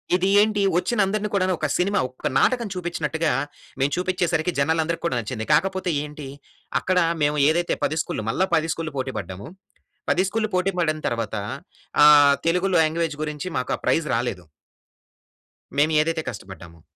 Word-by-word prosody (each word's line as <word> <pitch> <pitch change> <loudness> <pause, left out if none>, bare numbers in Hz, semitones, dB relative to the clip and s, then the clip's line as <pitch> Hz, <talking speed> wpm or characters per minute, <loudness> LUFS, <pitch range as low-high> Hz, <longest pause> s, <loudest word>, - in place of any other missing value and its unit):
ఇది 185 +1 +1
ఏంటి, 210 -1 +1 0.2
వచ్చిన 225 +5 -1
అందరిని 210 +1 -2
కూడాను 185 -1 +2
ఒక 155 - 0
సినిమా, 200 +3 +1
ఒక 130 - -4
నాటకం 235 - +2
చూపించినట్టుగా, 165 -3 -2 0.5
మేము 135 +2 +1
చూపించేసరికి 180 -2 0
జనాలందరికి 160 +3 0
కూడా 130 -7 0
నచ్చింది. 110 -1 -5
కాకపోతే 190 +3 +1
ఏంటి, 150 -1 -8 0.5
అక్కడ 185 -1 0 0.3
మేము 150 +1 +1
ఏదైతే 170 +2 +1
10 155 - 0
స్కూల్‌ల్లు 110 - -5
మళ్ళా 190 +11 +1
10 160 +1 0
స్కూల్‌ల్లు 155 -3 -6
పోటి 130 0 -3
పడ్డాము. 95 +2 -8 0.6
10 185 - +3
స్కూల్‌ల్లు 215 +1 -2
పోటి 185 +2 +1
పడిన 155 -2 0
తర్వాత, 115 -2 -3 0.7
ఆహ్, 145 -1 +8
తెలుగులో 180 +2 +2
లాంగ్వేజ్ 160 0 -1
గురించి 150 +3 -4
మాకు 125 - -2
ఆ - - -22
ప్రైజ్ 160 -2 +1
రాలేదు... 115 -7 -2 1.3
మేము 150 +2 +3
ఏదైతే 160 +1 -1
కష్టపడ్డామో. 85 -5 -10
160 Hz, 150 wpm, -23 LUFS, 140-185 Hz, 1.3 s, ఆహ్